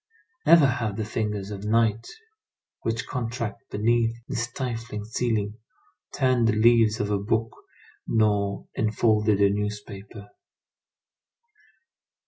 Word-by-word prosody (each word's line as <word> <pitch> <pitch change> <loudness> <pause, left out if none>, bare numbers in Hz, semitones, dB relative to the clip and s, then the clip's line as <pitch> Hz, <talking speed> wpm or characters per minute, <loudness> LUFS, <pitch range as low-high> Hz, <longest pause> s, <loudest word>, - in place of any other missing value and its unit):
Never 165 -2 +8
have 115 -6 -1
the 110 - -2
fingers 105 -2 -3
of 100 -1 -6
night 110 0 +1 0.7
which 115 +2 -2
contract 115 -2 -4
beneath 115 +2 +1
this 120 - -1
stifling 115 -4 -5
ceiling, 110 -1 -2 0.5
turned 130 -4 +2
the 110 - +2
leaves 110 0 +4
of 105 0 -1
a 100 - +1
book 115 +2 0 0.6
nor 105 -3 +1
unfolded 110 -1 +2
a 100 -1 +4
newspaper. 105 0 -5
110 Hz, 110 wpm, -25 LUFS, 105-115 Hz, 0.7 s, Never